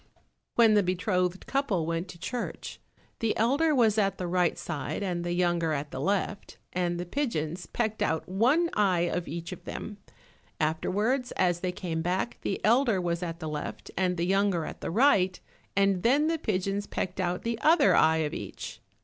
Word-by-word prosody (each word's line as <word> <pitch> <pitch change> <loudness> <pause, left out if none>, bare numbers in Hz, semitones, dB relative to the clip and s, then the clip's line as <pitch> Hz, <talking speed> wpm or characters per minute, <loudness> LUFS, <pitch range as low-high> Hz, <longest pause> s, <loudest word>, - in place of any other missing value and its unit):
When 225 -2 +6
the 210 - +5
betrothed 185 0 0
couple 230 - 0
went 165 +2 -2
to 180 - -10
church, 240 +7 -5 0.4
the 225 -1 0
elder 285 +8 +3
was 220 -4 +4
at 195 -1 +1
the 180 - -3
right 175 0 +1
side 155 +3 -4
and 175 -3 -2
the 175 0 -2
younger 175 -2 +1
at 145 0 -3
the 130 - -5
left, 200 +5 -2 0.2
and 175 -1 -1
the 175 - -3
pigeons 175 - -2
pecked 220 -2 -2
out 160 - 0
one 255 - +2
eye 190 -4 +2
of 175 0 -1
each 165 +2 -5
of 180 - -8
them. 210 -1 -6 0.6
Afterwards 210 - 0
as 175 -1 +1
they 180 0 -1
came 170 -3 -3
back, 180 +7 -1
the 195 - -2
elder 230 -2 +4
was 170 -1 -1
at 165 -1 -4
the 160 - -5
left, 150 -1 -5
and 180 -1 +1
the 170 - 0
younger 195 -3 +2
at - - -8
the - - -3
right, 190 -4 +3 0.4
and 195 -2 +3
then 275 +8 +3
the 325 0 0
pigeons 200 - -1
pecked 180 +1 -3
out 180 -1 -1
the 230 -1 -2
other 315 -1 +5
eye 160 0 +4
of 150 - -4
each. - - -7
185 Hz, 185 wpm, -28 LUFS, 175-220 Hz, 0.6 s, When